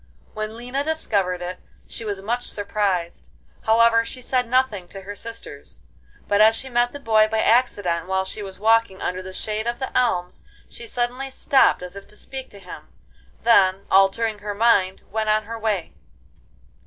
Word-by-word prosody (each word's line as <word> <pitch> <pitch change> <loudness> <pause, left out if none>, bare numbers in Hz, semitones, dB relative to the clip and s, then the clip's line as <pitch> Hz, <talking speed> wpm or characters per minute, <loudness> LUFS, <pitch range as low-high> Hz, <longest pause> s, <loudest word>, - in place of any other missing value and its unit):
When 215 +1 -5
Lina 250 +4 -3
discovered 200 - 0
it 180 +1 -5 0.3
she 230 - -8
was 200 -3 -4
much 240 +4 -1
surprised. 200 -4 -2 0.4
However, 230 +1 +5
she 240 +2 -7
said 250 -1 -1
nothing 240 -8 +1
to 195 +2 -10
her 205 +2 -7
sisters, 230 +2 -8 0.5
but 205 +1 +3
as 220 +1 +6
she 265 - -3
met 240 0 +2
the 285 - -8
boy 220 -4 +4
by 220 - -2
accident 205 -8 +2
while 190 0 0
she 200 +3 -5
was 190 -2 -7
walking 225 -1 +2
under 180 +1 -3
the 185 0 -8
shade 215 +3 -3
of 240 0 -1
the 265 - -5
elms, 180 -8 0 0.3
she 235 - -9
suddenly 245 +3 -2
stopped 265 -6 +3
as 180 +1 -7
if 200 - -10
to 210 - -12
speak 265 +2 -8
to 205 - -14
him; 195 - -11 0.6
then, 195 -4 +4
altering 205 +3 +3
her 205 0 -5
mind, 200 -4 +2
went 215 0 -1
on 215 0 +3
her 225 +2 -7
way. 210 -6 -2
215 Hz, 180 wpm, -23 LUFS, 195-235 Hz, 0.6 s, as